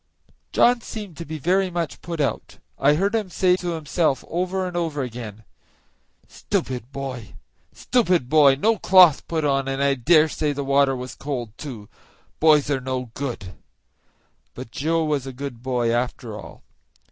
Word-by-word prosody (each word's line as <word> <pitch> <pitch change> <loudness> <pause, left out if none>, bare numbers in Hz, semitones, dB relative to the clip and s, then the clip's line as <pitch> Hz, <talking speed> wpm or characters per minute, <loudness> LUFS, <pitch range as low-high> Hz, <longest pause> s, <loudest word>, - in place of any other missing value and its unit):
John 245 0 +4
seemed 210 -6 -8
to 170 - -6
be 155 +1 -5
very 185 +5 +1
much 170 -3 -4
put 170 -1 -6
out. 145 - -2 0.2
I 145 +2 +4
heard 195 +6 0
him 215 -4 -1
say 180 0 +3
to 175 -2 -3
himself 155 -3 0
over 185 +2 -2
and 180 -1 -5
over 160 -5 -1
again, 115 -3 -7 0.8
"Stupid 125 -1 -3
boy! 130 -6 -6 0.4
stupid 185 - +1
boy! 145 -1 +6
no 220 +10 +1
cloth 180 -6 +6
put 160 -2 -1
on, 135 -1 +1
and 135 0 -2
I 140 0 +3
dare 155 +5 +4
say 150 -1 -2
the 140 0 -3
water 140 0 +3
was 125 0 -6
cold, 120 -6 -5
too; 120 -9 -8 0.5
boys 150 -2 +4
are 135 -2 0
no 130 -2 -4
good;" 115 -9 -5 1.0
but 125 -2 -9
Joe 160 +5 0
was 145 -3 -1
a 135 - -6
good 130 -2 -7
boy, 125 -2 0
after 120 -2 -3
all. - - -11
145 Hz, 165 wpm, -23 LUFS, 130-170 Hz, 1.0 s, boy